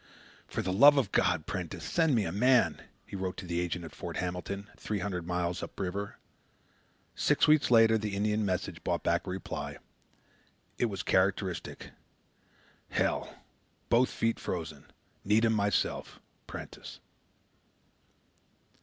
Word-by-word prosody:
"For - - -3
the 95 - -1
love 145 +8 +8
of 125 -8 +1
God, 75 - +2
Prentiss, 90 -1 -5
send 160 - +2
me 110 -4 +2
a 80 - -2
man," 125 +5 +3 0.2
he - - -9
wrote 95 -1 -3
to 90 - -6
the 85 -1 -1
agent 90 0 -2
at 80 - -10
Fort - - -6
Hamilton, 90 +3 -4
three 105 - -3
hundred 90 -3 -3
miles 90 0 -1
up - - -8
river. 100 +2 -3 1.0
Six - - +3
weeks 150 -1 +5
later 115 -2 +6
the 105 -2 -3
Indian 105 +1 +1
messenger 95 -2 -2
brought - - -1
back - - +1
a - - -3
reply. 95 -1 -5 1.0
It - - +3
was 100 -4 -3
characteristic: 95 -1 0 1.0
"Hell. - - 0 0.6
Both 120 +2 +4
feet 115 0 -1
frozen. 80 -5 -5 0.4
Need 105 +3 +3
him 110 - +3
myself 100 -1 0 0.3
Prentiss." - - -9
100 Hz, 140 wpm, -30 LUFS, 90-110 Hz, 1.0 s, love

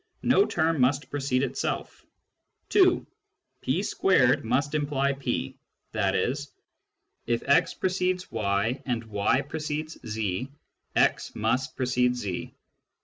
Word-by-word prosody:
no 400 - +4
term 160 -3 +1
must 135 +3 +1
precede 135 -2 0
itself. 135 - -3 0.7
(2) - - +4 0.6
P - - 0 0.3
a - - +5
must 140 +6 0
imply 140 -2 +1
P, 130 - -3 0.3
i.e. 110 +4 +1 0.9
if 115 0 0
x 140 - +4
precedes 185 0 -1
y 110 +4 0
and 120 -2 -1
y 110 +4 +1
precedes 155 +2 -4
z, 110 +2 -3 0.4
x - - +2
must 130 +5 0
precede 125 -1 +2
z. 100 -7 -4
130 Hz, 110 wpm, -27 LUFS, 115-145 Hz, 0.9 s, a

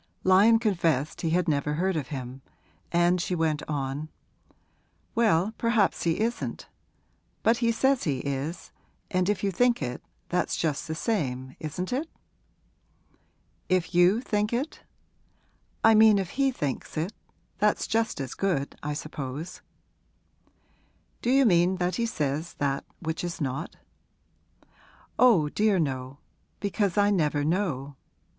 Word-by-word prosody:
Lyon 200 +5 +6
confessed 170 - 0
he 165 - 0
had 180 +2 +1
never 150 -1 0
heard 185 +3 0
of 145 -5 -2
him, 130 -2 -6 0.5
and 175 +1 +3
she 180 - -1
went 160 -3 0
on, 145 +1 -3 1.0
'Well, 215 -3 +2
perhaps 230 -6 +2
he 165 +1 0
isn't; 235 +2 -2 0.8
but 225 +1 +4
he 235 -1 +2
says 265 +3 +2
he 140 -5 0
is, 140 +4 -4 0.4
and 185 +1 +1
if 205 -2 -1
you 200 - +1
think 245 +5 +2
it, 125 -3 -4 0.3
that's 180 0 0
just 155 -4 -1
the 160 - -3
same, 130 - -2
isn't 180 +7 -4
it?' 300 +6 -2 1.6
'If 180 -2 +1
you 180 +6 +5
think 210 -4 -1
it?' 255 +6 -3 1.0
'I 225 - +7
mean 220 -1 +7
if 190 -2 -2
he 275 0 +2
thinks 145 - -4
it 165 +7 -2 0.5
that's 210 +1 +2
just 225 -4 0
as 135 -2 -4
good, 170 -8 -1
I 150 0 -3
suppose.' 150 +2 -6 1.6
'Do 235 - -1
you 270 +1 +5
mean 180 -2 +4
that 180 0 -1
he 235 -1 0
says 155 -3 -2
that 140 -1 -1 0.2
which 160 0 -3
is 175 +1 -4
not?' 140 +2 -3 1.4
'Oh 220 -12 +6
dear, 210 +3 +2
no 135 -4 -2 0.4
because 200 -2 -1
I 205 0 +4
never 150 -6 +1
know. 150 -6 -1
175 Hz, 135 wpm, -27 LUFS, 150-210 Hz, 1.6 s, I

